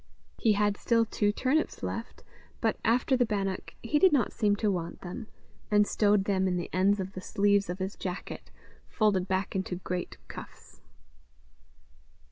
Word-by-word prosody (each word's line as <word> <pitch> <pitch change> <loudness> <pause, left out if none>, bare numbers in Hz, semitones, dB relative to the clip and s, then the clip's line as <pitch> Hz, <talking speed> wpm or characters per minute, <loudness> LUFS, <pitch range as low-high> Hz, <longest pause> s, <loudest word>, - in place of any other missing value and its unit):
He 220 - +4
had 205 0 +1
still 230 -1 +2
two 205 -1 +1
turnips 265 +8 0
left, - - -5 0.4
but, - - +1
after 245 +3 +3
the 250 - +3
bannock, 195 -4 -2
he 295 +6 +2
did 375 +1 +6
not 275 -5 +2
seem 210 -3 +2
to 205 0 +1
want 170 -3 -4
them, 190 +5 -7 0.4
and 210 0 +5
stowed 205 -1 +3
them 190 -1 +1
in 180 -1 0
the 175 - -4
ends 195 +3 +3
of 190 0 -4
the 185 - -6
sleeves 200 0 +2
of 180 - -3
his 190 +1 -4
jacket, 185 0 -6 0.4
folded 200 -5 +2
back 190 +1 -1
into 190 -1 -2
great 180 0 -4
cuffs. - - -11
205 Hz, 165 wpm, -29 LUFS, 190-220 Hz, 0.4 s, did